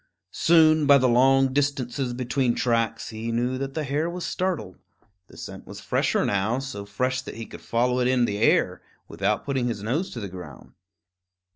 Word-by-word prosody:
Soon, 155 -2 +4
by 140 - +8
the 130 -1 +2
long 135 +2 +4
distances 135 -2 -1
between 125 0 0
tracks, 115 -2 0
he 110 +1 -5
knew 125 +2 -1
that 135 0 -5
the 155 - -1
hare 150 +4 -1
was 175 0 -5
startled. 180 - -3 0.5
The - - -16
scent - - -9
was - - -9
fresher - - 0
now, 100 +4 0
so 130 -7 -6
fresh 125 +5 -1
that - - -9
he 115 - -6
could - - -11
follow 125 +2 0
it 125 - +2
in 125 -1 +3
the 100 -2 -3
air, - - +2 0.3
without 105 +2 -1
putting 135 -3 -1
his 105 -4 -4
nose 145 - -1
to 120 - -5
the 100 - -5
ground. 90 -7 -11
125 Hz, 185 wpm, -25 LUFS, 115-135 Hz, 0.5 s, by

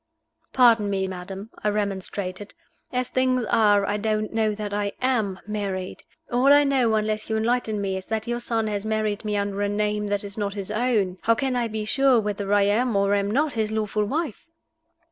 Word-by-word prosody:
"Pardon 230 -5 +5
me, 190 -1 0
madam," 190 +3 -7
I 210 - +2
remonstrated. 200 -1 -3 0.4
"As 250 0 -1
things 255 -1 +1
are, 205 -2 +3
I 205 +1 -1
don't 215 0 -1
know 220 -2 +1
that 205 -1 -5
I 205 -1 -1
am 220 -7 0
married. 200 -3 -4 0.3
All 250 +3 +4
I 290 0 +7
know, 260 -5 +2
unless 215 0 -1
you 220 - 0
enlighten 225 -1 0
me, 195 -1 -1
is 190 - -8
that 220 0 -2
your 240 0 -2
son 230 -2 -1
has 205 -2 -2
married 215 -1 -1
me 210 -1 -1
under 200 0 -2
a 205 - +1
name 210 0 -1
that 205 0 -1
is 200 +1 -6
not 200 -1 -2
his 200 0 -4
own. 215 -5 0
How 230 - +3
can 260 +2 -1
I 240 -1 0
be 215 -1 -4
sure 270 +1 +3
whether 205 -2 -3
I 205 -1 +5
am 220 +3 +1
or 200 0 +2
am 200 0 +1
not 285 +5 +1
his 220 -2 -1
lawful 215 -1 -1
wife?" 300 +3 -3
210 Hz, 200 wpm, -24 LUFS, 200-230 Hz, 0.4 s, I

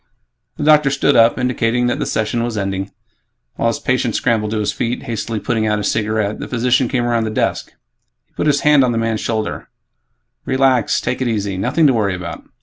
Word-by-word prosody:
The - - -3
doctor 150 -1 +5
stood 140 +1 +1
up, 115 0 +5
indicating 125 -1 0
that 120 - 0
the - - -2
session 110 +2 -1
was 115 -2 -3
ending. 95 -1 -3 0.6
While - - -1
his - - 0
patient - - -1
scrambled 110 -2 0
to 110 - -2
his 105 -1 0
feet, 120 +3 -3
hastily 110 -1 -3
putting 110 +1 -1
out 105 0 +1
his 105 -1 0
cigarette, 110 -1 -1
the - - -5
physician 125 +1 +1
came 120 0 -1
around 120 -2 0
the - - -2
desk. 110 - -2 0.5
He - - -44
put - - -2
his 145 -1 +2
hand 150 -2 +5
on 125 -2 +1
the - - -1
man's 115 -1 -1
shoulder, 110 -2 -3 0.7
"Relax, 130 -3 +2
take 125 - -3
it 130 - 0
easy 100 -4 -2
nothing 150 - +1
to 135 - +5
worry 100 -5 0
about. 90 -1 -7
115 Hz, 210 wpm, -18 LUFS, 105-125 Hz, 0.7 s, doctor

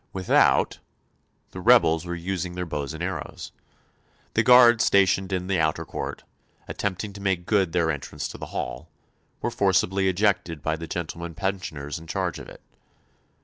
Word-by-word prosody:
Without 95 -1 +3 0.7
the - - -7
rebels 80 +1 +4
were 85 - -3
using 90 0 -4
their 90 0 -3
bows 75 -3 -4
and 80 - -5
arrows. 90 -1 -5 0.8
The 110 - +3
guard 120 -1 +7
stationed 95 -1 +3
in 90 -1 -1
the 95 -2 0
outer 80 +1 0
court, - - -6 0.4
attempting 100 +1 -3
to 100 - -10
make 95 -3 -1
good 95 -5 +2
their 85 -2 +1
entrance 70 -3 -5
to - - -9
the - - -6
hall, - - -5 0.5
were - - 0
forcibly 95 0 +2
ejected 90 -6 0
by 80 +1 0
the 80 +1 -7
gentlemen 85 0 -5
pensioners 80 -6 -4
in 80 - -13
charge - - -2
of - - -10
it. - - -14
90 Hz, 160 wpm, -25 LUFS, 80-95 Hz, 0.8 s, guard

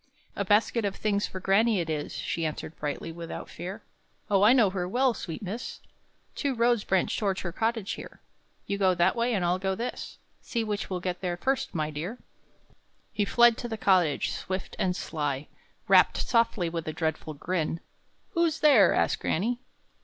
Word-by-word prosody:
"A 200 - -1
basket 210 +3 +2
of 200 -1 -1
things 205 -1 0
for 185 - -7
granny, 205 +3 +3
it 170 - -2
is," 150 -2 -3
She 165 - -2
answered 155 0 -4
brightly, 150 +2 -3
without 165 0 -7
fear. 190 +5 -7 0.5
"Oh, 195 -1 +4
I 210 +3 +7
know 230 -7 +5
her 190 - -3
very 180 - -1
well, 250 +5 +2
sweet 175 0 -6
miss! 210 +6 -5 0.5
Two 280 -3 -1
roads 235 -2 +2
branch 190 -1 +1
towards 195 -3 -1
her 175 - -4
cottage 225 +1 -1
here; - - -8 0.5
You 200 - -2
go 190 -2 +4
that 175 0 +3
way, 235 +1 +1
and 185 -3 0
I'll 180 +1 +1
go 190 0 -1
this. 235 +5 -5 0.2
See 230 -2 -2
which 210 -2 -3
will 185 -2 -3
get 180 -1 -3
there 175 -2 -2
first, 265 +3 -1
my 155 -1 -1
dear!" 170 +11 -5 1.0
He 205 - +1
fled 240 +2 +5
to 240 - -4
the 220 -2 -4
cottage, 180 -8 +2
swift 190 0 -4
and 180 -1 +1
sly; 145 -4 -3 0.4
Rapped - - +5
softly, 230 -6 +1
with 165 -1 -4
a 155 - -2
dreadful 155 -1 -2
grin. 165 +1 -2 0.5
"Who's 335 -2 +1
there?" 255 - +6
asked - - +1
granny. 235 +9 0
195 Hz, 185 wpm, -28 LUFS, 175-230 Hz, 1.0 s, I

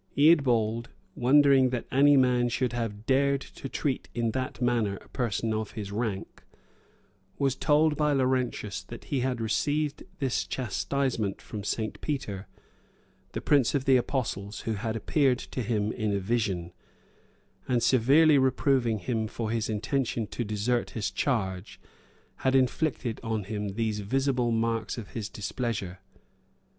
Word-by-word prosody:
Eadbald, 120 -7 +4 0.3
wondering 135 0 +5
that 125 -2 -3
any 140 +2 +6
man 125 -2 +3
should 120 0 -1
have 115 -3 -4
dared 140 +2 +3
to 135 0 -9
treat 135 -1 -2
in 115 -1 0
that 130 0 -3
manner 120 -5 +1
a - - -14
person 115 -2 -1
of 110 -1 -3
his 105 -3 -5
rank, 105 -2 -3 1.0
was 135 -2 +1
told 150 +2 +3
by 150 -1 +2
Laurentius, 130 -7 0
that 115 +6 -10
he 140 - -1
had 125 -1 -1
received 145 +6 0 0.2
this 135 -6 -1
chastisement 125 -3 -1
from 105 -2 -7
St. 110 +2 -3
Peter, 110 -10 -3 0.9
the - - -3
prince 140 -2 +3
of 135 -1 0
the 135 - +5
apostles, 110 -5 -2
who 115 - -2
had 110 +1 -3
appeared 130 +3 +2
to 130 - -5
him 110 -2 0
in 110 -3 -2
a 100 - 0
vision, 95 -5 -1 0.9
and 120 -2 +1
severely 140 +5 +5
reproving 130 -3 +2
him 110 +2 -2
for 110 0 -4
his 115 -1 -1
intention 115 +2 -1
to 120 - -4
desert 110 +3 -1
his 100 -3 -1
charge, 95 -4 -2 0.6
had 130 0 +1
inflicted 130 -2 +1
on 110 -2 -2
him 105 -1 -4
these 110 -2 -1
visible 130 +3 0
marks 115 0 -1
of 110 -4 -7
his 110 -3 -4
displeasure. 105 -4 -4
120 Hz, 145 wpm, -28 LUFS, 110-135 Hz, 1.0 s, any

